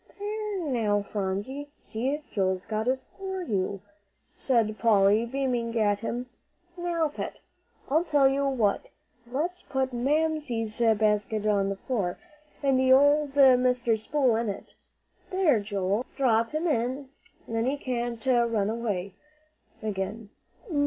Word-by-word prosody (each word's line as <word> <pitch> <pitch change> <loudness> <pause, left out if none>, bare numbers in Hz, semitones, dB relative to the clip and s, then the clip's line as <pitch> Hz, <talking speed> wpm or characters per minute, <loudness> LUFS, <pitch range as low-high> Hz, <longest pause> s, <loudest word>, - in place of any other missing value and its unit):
"There 415 -1 -3
now, 215 -6 +1
Phronsie; 205 +9 -3
see, 270 +7 -3
Joel's 190 -2 0
got 220 +1 -2
it 260 +1 +1 0.2
for 380 -1 -4
you," 200 - -2 0.5
said 225 -5 0
Polly, 215 0 +4
beaming 240 -3 -1
at 205 -1 +2
him. 240 +3 -3 0.5
"Now, 345 -3 0
Pet, - - -6 0.5
I'll 315 +5 +2
tell 290 -5 +4
you 275 +1 +1
what, 230 -7 0 0.4
let's 345 +7 -2
put 265 -1 -2
Mamsie's 270 -4 0 0.2
basket 210 0 +1
on 200 -2 +2
the 195 - -2
floor, 195 -5 -2 0.5
and 270 -2 +3
old 285 +1 +5
Mr. 250 -4 +4
Spool 250 0 +1
in 230 -1 -1
it. 195 - -7 0.6
There, 360 - +3
Joey, 200 +1 -1
drop 230 -4 +2
him 310 +3 -2
in, 260 -2 -1 0.4
then 225 +1 -1
he 280 +2 0
can't 240 -2 -3
run 235 -5 +2
away 205 -5 -3 0.7
again. 210 +1 -4
240 Hz, 125 wpm, -27 LUFS, 215-280 Hz, 0.7 s, old